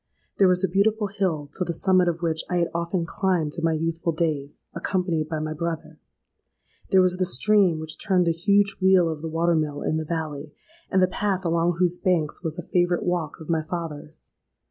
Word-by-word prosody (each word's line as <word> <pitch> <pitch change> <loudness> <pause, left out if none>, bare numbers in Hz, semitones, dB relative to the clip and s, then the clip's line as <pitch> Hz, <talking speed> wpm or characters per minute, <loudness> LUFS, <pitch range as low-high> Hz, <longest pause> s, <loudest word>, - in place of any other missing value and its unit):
There 195 - +6
was 180 +1 +2
a - - +3
beautiful 205 +3 +1
hill 175 -8 0
to 185 - -1
the 175 - -3
summit 185 +1 +3
of 170 0 -2
which 160 -1 0
I 180 - 0
had 170 -1 0
often 170 +1 -1
climbed 170 -4 -1
in - - -6
my 165 -1 +2
youthful 165 +1 -1
days, 155 -4 -3
accompanied 170 -3 -1
by 160 - -2
my 155 0 -3
brother. 165 +1 -5 0.9
There 190 -2 +5
was 180 0 +2
the 185 - +1
stream 190 - +3
which 160 0 -5
turned 185 -4 +2
the 170 - +3
huge 200 +4 +2
wheel 185 -2 +5
of 160 -2 -4
the 165 - -4
water 170 +2 +1
mill 150 -3 -1
in 155 - 0
the 160 - -2
valley, 155 -2 -4 0.4
and 190 -1 +3
the - - +5
path 190 0 -2
along 170 +1 +1
whose 180 0 +1
banks 175 -6 0
was 160 -1 -3
a 175 - -5
favourite 175 0 +1
walk 175 -4 -2
of 160 - -10
my 160 -1 +1
father's. 155 -2 -7
170 Hz, 210 wpm, -24 LUFS, 160-185 Hz, 0.9 s, There